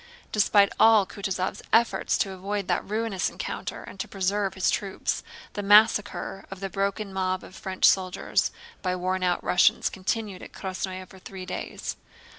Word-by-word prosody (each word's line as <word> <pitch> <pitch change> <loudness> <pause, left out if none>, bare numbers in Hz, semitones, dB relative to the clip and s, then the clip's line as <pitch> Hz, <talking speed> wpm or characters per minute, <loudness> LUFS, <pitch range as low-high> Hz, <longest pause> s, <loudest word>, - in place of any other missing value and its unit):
Despite 205 -1 +4
all 220 -3 +7
Kutúzov's 190 -1 -3
efforts 230 +1 +3
to 195 - 0
avoid 195 +1 -3
that - - +1
ruinous 215 -3 0
encounter - - -5
and 195 - -11
to - - -3
preserve 195 0 -1
his 190 - +2
troops, 195 -2 -2 0.3
the 205 - -3
massacre 205 -1 +4
of 195 - -8
the 195 -1 -4
broken 200 +1 -2
mob 185 -1 -1
of 185 - -12
French 190 -1 0
soldiers 185 -1 +2 0.3
by 185 -1 0
worn 185 +1 -1
out 180 -1 +1
Russians 180 - +3
continued 195 0 -3
at - - -11
Krásnoe 185 -1 -5
for 190 - -15
three 185 0 -8
days. 180 - -5
195 Hz, 160 wpm, -26 LUFS, 185-205 Hz, 0.3 s, all